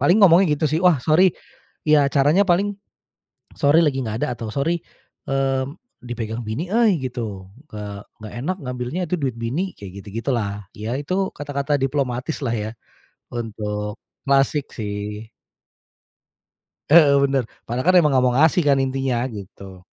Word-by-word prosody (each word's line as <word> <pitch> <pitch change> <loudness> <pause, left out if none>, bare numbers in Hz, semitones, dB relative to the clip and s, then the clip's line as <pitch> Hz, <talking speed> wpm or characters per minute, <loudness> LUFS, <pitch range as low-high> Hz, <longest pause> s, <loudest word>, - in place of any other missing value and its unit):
Paling 175 +10 +4
ngomongnya 175 -3 +6
gitu 155 - -2
sih, 155 +3 0
"Wah 180 -4 +6
sorry." 170 +3 +4 0.6
Ya 150 -1 +6
caranya 150 +8 +4
paling, 195 +2 +1 0.8
"Sorry 145 +3 +4
lagi 135 -3 0
nggak 110 0 -4
ada," 125 - -2
atau 115 -2 -5
"Sorry 165 +8 -1 0.5
mmm, 135 +2 -1 0.3
dipegang 120 -1 -4
bini 125 +11 -3
euy," 220 -5 +3
gitu. 110 -7 -5 0.3
"Eee, 105 -1 -6 0.2
nggak 110 -1 -9
enak 185 +5 -1
ngambilnya, 125 +5 -4
itu 170 - -2
duit 130 -4 -1
bini." 150 +12 -2
Kayak 100 -1 -9
gitu-gitu 115 +6 -4
lah. 105 -3 -3
Ya 110 +3 -3
itu 185 +6 -1
kata-kata 145 0 -2
diplomatis 135 +1 -1
lah, 120 - 0
ya 110 -1 -3 0.6
untuk 105 -2 -4 0.3
klasik, 140 +1 +2
sih. 105 0 -5 1.6
Heeh. 145 -3 +7
Benar. 135 -3 +1 0.2
Padahal 130 +11 +2
emang 155 -5 +5
nggak 130 -1 +3
mau 125 -1 +2
ngasih 160 +4 +4
kan, 140 - +5
intinya. 135 -2 -1 0.2
Gitu. 95 -2 -11
135 Hz, 145 wpm, -22 LUFS, 110-155 Hz, 1.6 s, Heeh